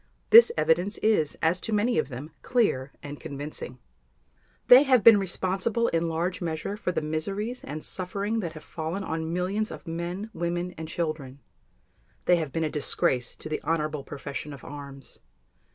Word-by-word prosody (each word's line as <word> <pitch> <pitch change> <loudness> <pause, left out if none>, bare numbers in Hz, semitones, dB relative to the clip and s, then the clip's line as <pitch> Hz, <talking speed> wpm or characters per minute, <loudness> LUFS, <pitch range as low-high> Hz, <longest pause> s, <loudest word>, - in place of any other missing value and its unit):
This 465 +1 +10
evidence 180 +6 +2
is, 210 -9 +2
as 170 +3 +2
to 220 - -1
many 220 -1 +2
of 150 - -1
them, 135 +5 -7
clear 140 - +1
and 145 0 -7
convincing. 140 -3 -6 0.9
They 250 +2 +9
have 260 -6 +4
been 225 -3 +9
responsible 195 +5 0
in 165 0 0
large 175 +4 -2
measure 165 +3 -3
for 210 -4 -2
the 165 - -2
miseries 195 +10 -3
and 150 +2 -6
suffering 200 +4 -2
that 170 -6 -4
have 155 - -10
fallen 165 +5 -4
on 160 -2 -3
millions 190 +5 -1
of - - -10
men, 175 +6 -4
women, 175 +1 -2
and 160 -2 -8
children. 155 -5 -4 0.9
They 180 - +5
have 155 -4 -3
been 165 +4 -1
a - - +1
disgrace 130 -4 +1
to - - -8
the 155 - -3
honorable 155 -3 -1
profession 140 +1 -6
of 140 - -11
arms. 140 -1 -9
170 Hz, 170 wpm, -27 LUFS, 150-200 Hz, 0.9 s, This